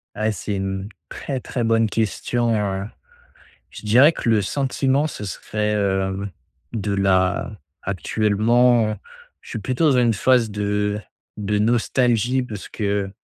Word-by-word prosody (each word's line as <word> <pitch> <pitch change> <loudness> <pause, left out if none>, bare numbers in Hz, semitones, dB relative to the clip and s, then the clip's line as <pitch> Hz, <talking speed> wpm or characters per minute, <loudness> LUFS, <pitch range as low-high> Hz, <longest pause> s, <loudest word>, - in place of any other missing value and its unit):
Eh, 110 +1 0
c'est 105 +1 -4
une 95 +1 -3 0.2
très, 135 -3 -4
très 120 -1 -3
bonne 115 -1 +2
question, 115 +2 0
heu, 100 -2 -1 0.9
je - - -11
dirais 130 +9 +6
que 115 - -2
le 110 -2 +4
sentiment 135 +4 0
ce 105 - -7
serait, 105 +2 -2
heu, 95 -1 0 0.5
de 105 -2 -2
la 95 +1 +1 0.2
actuellement, 110 +4 +2 0.5
je - - -15
suis 115 - -4
plutôt 130 +7 +1
dans 130 - +3
une 120 -2 +3
phase 115 +1 +2
de 105 0 -1 0.4
de 105 0 -1
nostalgie 120 +2 +2
parce 105 -5 -8
que, 100 -2 -1
105 Hz, 135 wpm, -22 LUFS, 100-120 Hz, 0.9 s, dirais